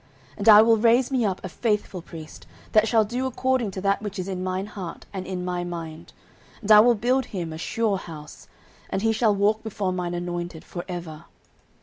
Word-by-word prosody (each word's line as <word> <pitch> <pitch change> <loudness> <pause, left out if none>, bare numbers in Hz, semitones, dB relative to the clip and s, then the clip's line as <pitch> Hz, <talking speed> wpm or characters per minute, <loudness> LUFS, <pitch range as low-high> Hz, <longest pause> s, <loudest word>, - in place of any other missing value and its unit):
09:002:035 - - -26
And 205 +2 +3
I 210 0 +10
will 225 0 +4
raise 235 +4 +3
me 255 -4 +1
up 190 -1 -2
a - - -5
faithful 210 -3 -2
priest, 160 -2 -11 0.2
that 215 +1 +4
shall 220 -1 +3
do 250 +5 -2
according 260 -2 0
to 190 0 -6
that 200 +1 +1
which 205 -1 -6
is 185 0 -4
in 185 -2 -4
mine 185 +1 -2
heart 195 -5 -8
and 190 -1 -5
in 180 -1 -4
my 180 -1 -2
mind: 165 -2 -7 0.5
and 215 -1 -1
I 210 - +10
will 235 +2 +6
build 250 +5 +1
him 170 -5 -5
a 160 - -7
sure 215 +2 0
house; 150 -4 -11 0.4
and 195 - -2
he 225 - +3
shall 220 -2 +2
walk 210 +2 +2
before 205 -4 -3
mine 175 -1 -3
anointed 175 -1 -5
for 175 - -6
ever. 170 -3 -7
195 Hz, 215 wpm, -24 LUFS, 175-220 Hz, 0.5 s, I